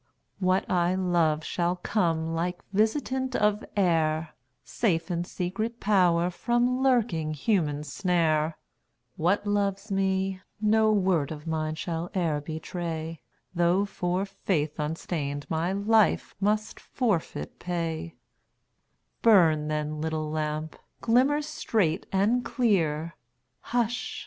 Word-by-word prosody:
What 185 0 +1
I 175 0 +2
love 170 -4 +1
shall 175 +2 0
come 165 -4 0
like 175 +2 -2
visitant 260 +5 0
of 210 0 +2
air, 160 -4 +1 0.3
Safe 180 -6 0
in 175 0 -1
secret 215 +7 -3
power 180 -4 +3
from 240 +6 +1
lurking 210 -13 +1
human 150 -4 0
snare; 160 -3 +1 0.6
What 180 +6 +1
loves 200 0 -1
me, 190 -1 0 0.2
no 215 +1 +3
word 185 -8 +2
of 150 0 -7
mine 155 -1 -2
shall 165 +1 -3
e'er 160 -5 0
betray, 160 +1 -5 0.3
Though 175 +3 +2
for 185 -1 -1
faith 175 -6 -2
unstained 150 -2 -3
my 165 +3 0
life 210 +2 +2
must 210 +2 0
forfeit 180 - -2
pay 170 -2 -3 1.1
Burn, 165 -9 +5
then, 150 0 -2
little 155 -1 -2
lamp; 155 0 -3 0.2
glimmer 265 +6 +3
straight 220 - -1
and 215 +6 +2
clear 170 -10 0 0.4
Hush! 240 0 -2
175 Hz, 110 wpm, -27 LUFS, 160-205 Hz, 1.1 s, Burn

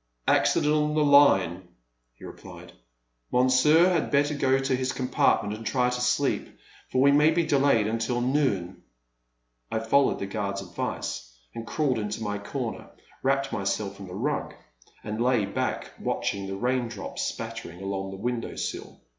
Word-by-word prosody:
Accident 150 0 +3
on 150 0 +1
the 155 -1 +3
line,*' 95 -12 +5 0.5
he - - -13
replied; - - -11 0.6
Monsieur 130 +7 +5
had 175 -3 +1
better 145 +1 +2
go 135 -2 +2
to 135 -1 0
his 130 -1 -2
compartment 110 -4 +1
and 110 - -9
try 125 +3 +1
to 125 0 -3
sleep, 125 +3 +1 0.4
for 130 - +2
we 140 - +6
may 150 +2 +5
be 165 +1 +1
delayed 140 -7 +3
until 115 +3 -1
noon/* 120 -9 0 0.9
I - - 0
followed 115 +5 +2
the - - -4
guard's 100 -1 -3
advice, 85 -8 -5 0.2
and 115 0 -7
crawling 135 -7 0
into 105 +2 -4
my 105 -1 -3
comer, 120 +3 -5 0.3
wrapped 135 0 0
myself 100 0 -2
in 100 - -8
the 90 - -8
rug - - -2 0.5
and 110 +2 -4
lay 125 -4 +2
back 100 - -3
watching 100 -1 -2
the 95 - -4
rain 125 +3 0
drops 105 -4 -6
spattering 85 +1 -5
along 95 0 -3
the 95 - -7
window 120 +3 -3
sill. - - -6
125 Hz, 160 wpm, -26 LUFS, 100-140 Hz, 0.9 s, we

